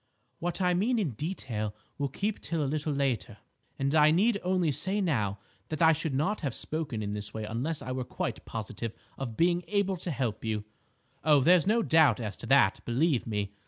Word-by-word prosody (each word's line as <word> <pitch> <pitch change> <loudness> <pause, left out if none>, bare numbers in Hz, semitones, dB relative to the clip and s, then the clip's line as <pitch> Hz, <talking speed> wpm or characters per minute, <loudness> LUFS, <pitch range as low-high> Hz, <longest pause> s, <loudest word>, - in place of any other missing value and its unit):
"What 175 +3 -3
I 180 0 +3
mean 220 +8 +2
in 190 - 0
detail 115 - -4 0.2
will 140 -1 0
keep 200 - -2
till 165 -3 -1
a - - 0
little 150 +2 -1
later, 135 -6 -1 0.4
and 140 +1 0
I 155 -1 +6
need 200 +7 +3
only 180 -3 +1
say 190 +9 -1
now 110 - 0 0.3
that 155 - -3
I 160 -1 +6
should 155 -2 -2
not 185 +10 0
have 140 -7 -2
spoken 150 -9 -3
in 105 0 -3
this 105 +1 -5
way 110 - -3
unless 125 +9 -2
I 130 - -5
were 130 0 -2
quite - - -4
positive 110 0 -5 0.2
of 120 -5 -5
being 175 +1 +3
able 200 -2 +1
to 175 - -5
help 125 -7 -2
you. 110 -2 -1 0.6
Oh, 150 -1 +6
there's 175 +5 +5
no 225 +2 +3
doubt 160 -7 +5
as 105 -4 -4
to - - -8
that, - - +4
believe 130 +2 +1
me. 105 -2 -2
150 Hz, 200 wpm, -29 LUFS, 115-175 Hz, 0.6 s, I